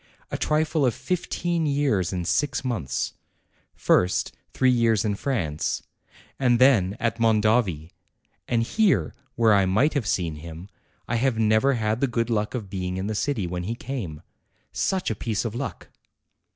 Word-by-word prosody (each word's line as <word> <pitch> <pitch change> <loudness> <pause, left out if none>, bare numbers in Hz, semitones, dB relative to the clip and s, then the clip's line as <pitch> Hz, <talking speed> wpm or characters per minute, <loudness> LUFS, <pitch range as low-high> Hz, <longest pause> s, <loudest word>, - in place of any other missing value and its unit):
A - - -2
trifle 155 0 +1
of 125 -4 +2
fifteen 175 -2 -1
years 135 -11 +1
and 90 -2 -3
six 145 -2 0
months. 95 - -2 0.6
First, 90 +1 +2 0.2
three 130 -1 +3
years 115 -3 +2
in 105 - +1
France, 100 - -2 0.6
and 125 -3 +3
then 115 -6 +4
at 115 -1 -1
Mondovi, 110 -7 +2 0.6
and 115 -2 +1
here, 210 - +2 0.2
where 115 -2 +4
I 100 -2 +4
might 110 +12 +2
have 135 -9 -1
seen 85 -3 -1
him, 85 +4 -9 0.4
I 120 - 0
have 125 -1 +1
never 110 +5 +3
had 110 +1 -1
the 140 - +3
good 115 -1 -1
luck 105 +1 -1
of 110 -5 -4
being 90 -1 -4
in 95 - -3
the 110 - -2
city 110 -1 -1
when 90 0 -4
he 115 +4 -2
came. 100 - -6 0.5
Such 190 -9 -1
a - - -2
piece 110 +1 -2
of 110 - -3
luck!" 120 - -5
115 Hz, 165 wpm, -25 LUFS, 95-130 Hz, 0.6 s, then